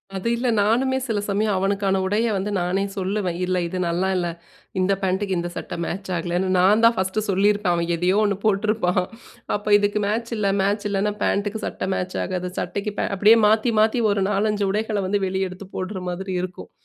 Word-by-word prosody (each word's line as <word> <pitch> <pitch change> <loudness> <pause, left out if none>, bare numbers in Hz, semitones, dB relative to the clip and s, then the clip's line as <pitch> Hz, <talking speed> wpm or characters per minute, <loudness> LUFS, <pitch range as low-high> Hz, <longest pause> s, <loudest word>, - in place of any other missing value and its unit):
அது 190 +3 -3
இல்ல. 245 +2 -2
நானுமே 250 +6 +2
சில 225 -5 -1
சமயம் 205 0 +1
அவனுக்கான 195 0 +1
உடைய 210 +4 +1
வந்து 195 +2 -2
நானே 180 +3 0
சொல்லுவேன். 190 -2 -1
இல்ல, 185 0 0
இது 185 - -5
நல்லா 175 +3 0
இல்ல. 175 -1 0 0.5
இந்த 185 +2 +2
பேண்ட்டுக்கு 190 0 0
இந்த 175 0 -3
சட்டை - - -5
மேட்ச்சாகலன்னு, 180 0 -2
நான் 205 +5 +4
தான் 230 0 +5
ஃபர்ஸ்ட்டு 190 +3 -1
சொல்லியிருப்பேன். 200 -1 +2
அவன் 170 0 -1
எதையோ 180 +4 +1
ஒண்ணு 200 -2 0
போட்டுருப்பான். 205 -3 +2 0.5
அப்போ 205 +1 -3
இதுக்கு 205 +1 0
மேட்ச் 230 +3 -2
இல்ல, 205 -2 0
மேட்ச் 205 +2 0
இல்லன்னா, 205 +1 0
பேண்ட்டுக்கு 205 +1 -1
சட்டை - - -4
மேட்ச் 180 0 -3
ஆகாது. 180 -1 -3
சட்டைக்குபே 200 +3 -3
அப்பிடியே 210 +4 +6
மாத்தி, 220 +3 +3
மாத்தி 225 +2 +2
ஒரு 200 -1 +1
4,5 210 0 +1
உடைகள 215 +1 -1
வந்து 200 +1 0
வெளிய 190 0 -1
எடுத்து 185 +1 -10
போடுற 185 +1 -4
மாதிரி 190 +2 -4
இருக்கும். 185 -1 -8
200 Hz, 180 wpm, -23 LUFS, 185-210 Hz, 0.5 s, அப்பிடியே